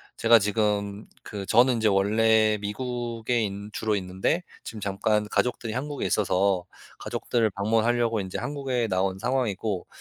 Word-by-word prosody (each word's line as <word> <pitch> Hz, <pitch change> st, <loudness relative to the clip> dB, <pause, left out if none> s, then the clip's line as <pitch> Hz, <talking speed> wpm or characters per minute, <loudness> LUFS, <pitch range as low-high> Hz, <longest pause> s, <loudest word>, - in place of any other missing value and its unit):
제가 115 Hz, 0 st, +6 dB
지금 105 Hz, 0 st, -1 dB, 0.2 s
그 100 Hz, -2 st, -6 dB
저는 120 Hz, +2 st, +5 dB
인제 110 Hz, -1 st, +1 dB
원래 110 Hz, +2 st, +3 dB
미국에 120 Hz, +1 st, -2 dB
있 105 Hz, -, 0 dB, 0.2 s
주로 110 Hz, -1 st, 0 dB
있는데 95 Hz, -, -1 dB, 0.2 s
지금 110 Hz, -, -7 dB
잠깐 105 Hz, +2 st, 0 dB
가족들이 120 Hz, -2 st, -1 dB
한국에 145 Hz, +3 st, -3 dB
있어서 95 Hz, -2 st, +1 dB, 0.4 s
가족들을 115 Hz, -3 st, -1 dB
방문하려고 115 Hz, +3 st, +1 dB
인제 95 Hz, -1 st, -4 dB
한국에 135 Hz, -5 st, -2 dB
나온 95 Hz, 0 st, 0 dB
상황이고 110 Hz, -5 st, -2 dB
110 Hz, 325 characters per minute, -26 LUFS, 100-120 Hz, 0.4 s, 제가